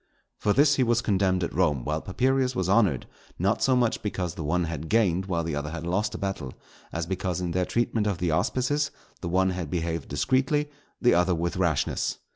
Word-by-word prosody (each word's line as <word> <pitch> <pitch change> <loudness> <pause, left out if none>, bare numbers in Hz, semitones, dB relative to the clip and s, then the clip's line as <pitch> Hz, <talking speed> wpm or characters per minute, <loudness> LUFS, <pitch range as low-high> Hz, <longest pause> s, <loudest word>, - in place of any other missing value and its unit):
For 105 - +1
this 140 +5 +4
he 130 - +4
was 120 -1 +2
condemned 95 -3 +1
at - - -3
Rome, 75 -8 +1
while 75 +1 -1
Papirius 130 +5 +1
was 95 -7 0
honoured; 95 - +3 0.3
not 100 +5 +1
so 130 - +3
much 120 -3 +1
because 90 -5 -3
the 85 - -6
one 85 +4 +1
had 80 -1 -4
gained 95 -5 +2
while 85 -3 0
the 80 -2 -2
other 75 +1 -3
had 80 0 -6
lost 105 +5 0
a - - -3
battle, 95 -11 -4 0.4
as 80 0 -2
because 90 0 -2
in 90 -1 -2
their 90 +1 +1
treatment 115 -1 0
of 100 -4 0
the 85 -1 0
auspices 140 - +1 0.3
the 85 - -3
one 95 +2 +2
had 90 -4 -4
behaved 85 -1 -2
discreetly, 135 - +1 0.3
the 125 - +4
other 90 +1 +3
with 85 +2 -2
rashness. 85 -6 0
95 Hz, 210 wpm, -26 LUFS, 85-115 Hz, 0.4 s, this